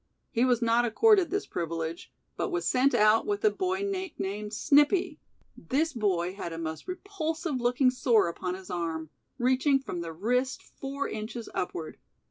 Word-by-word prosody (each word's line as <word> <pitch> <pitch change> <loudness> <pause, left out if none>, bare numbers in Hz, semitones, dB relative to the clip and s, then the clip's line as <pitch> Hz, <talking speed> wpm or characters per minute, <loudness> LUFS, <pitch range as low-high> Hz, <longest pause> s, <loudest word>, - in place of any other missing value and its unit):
He 235 +2 +2
was 245 -2 +2
not 230 +1 +3
accorded 385 - +4
this 400 +2 -1
privilege, 165 0 -4 0.2
but - - -2
was 355 -1 -1
sent 260 +2 +3
out 215 - +4
with 410 +1 -1
a 425 - +6
boy 375 0 -1
nicknamed 290 - -3
"Snippy". 295 - +3 0.4
This 305 +4 -1
boy 185 -6 0
had 180 -3 -6
a 165 - -6
most 160 -1 -5
repulsive 325 -7 -3
looking 250 +2 +3
sore 240 -6 +3
upon 180 +2 -3
his 190 -1 -10
arm, 165 -3 -3 0.3
reaching 260 +3 +3
from 225 -10 -5
the 165 -1 -5
wrist 250 +9 -1
four 275 +1 -5
inches 220 +2 -6
upward. 165 -3 -4
245 Hz, 160 wpm, -28 LUFS, 190-315 Hz, 0.4 s, a